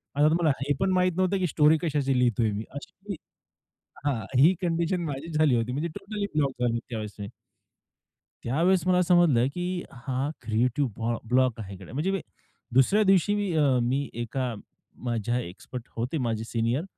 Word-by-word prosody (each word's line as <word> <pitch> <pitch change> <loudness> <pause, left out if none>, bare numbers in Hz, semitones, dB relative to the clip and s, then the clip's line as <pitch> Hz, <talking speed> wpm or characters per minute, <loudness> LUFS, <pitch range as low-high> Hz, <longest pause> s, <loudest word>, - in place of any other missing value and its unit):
आता 145 +2 +5
तुम्हाला 165 -1 +3
हे 145 +2 +1
पण 190 0 +2
माहीत 185 0 +3
नव्हतं 185 +1 +2
की 185 - +1
स्टोरी 155 0 +4
कशाची 145 -5 0
लिहितोय 120 -3 +2
मी 105 +1 -3
अशी 195 +8 -8 0.9
हां, 130 -7 0
ही 160 +7 +7
कंडिशन 170 +1 0
माझीच 155 +2 -4
झाली 155 -5 +4
होती. 115 +1 0
म्हणजे 150 +6 -2
टोटली 205 +1 -4
ब्लॉक 140 -3 +2
झालो 120 -1 +1
त्यावेळेस 110 -3 -5
मी. 100 - -4 1.2
त्यावेळेस 170 +9 +2
मला 180 0 +4
समजलं, 170 -9 +4
की 180 0 -2
हा 130 +2 -3
क्रिएटिव्ह 120 +5 0
ब्लॉ 115 +1 -1
ब्लॉक 125 -2 +2
आहे 100 -2 -7
गड्या, 95 +4 -12
म्हणजे 155 +8 0
मी, 195 -2 -1 0.5
दुसऱ्या 135 - +4
दिवशी 195 +1 +3
मी 205 -2 -1
अ, 140 -4 +4
मी 135 +4 0
एका 120 +2 -3 0.5
माझ्या 120 +1 0
एक्सपर्ट 115 +4 -7
होते 125 +7 -1
माझे 115 -5 -1
सीनियर, 115 +5 -1
140 Hz, 165 wpm, -27 LUFS, 120-175 Hz, 1.2 s, ही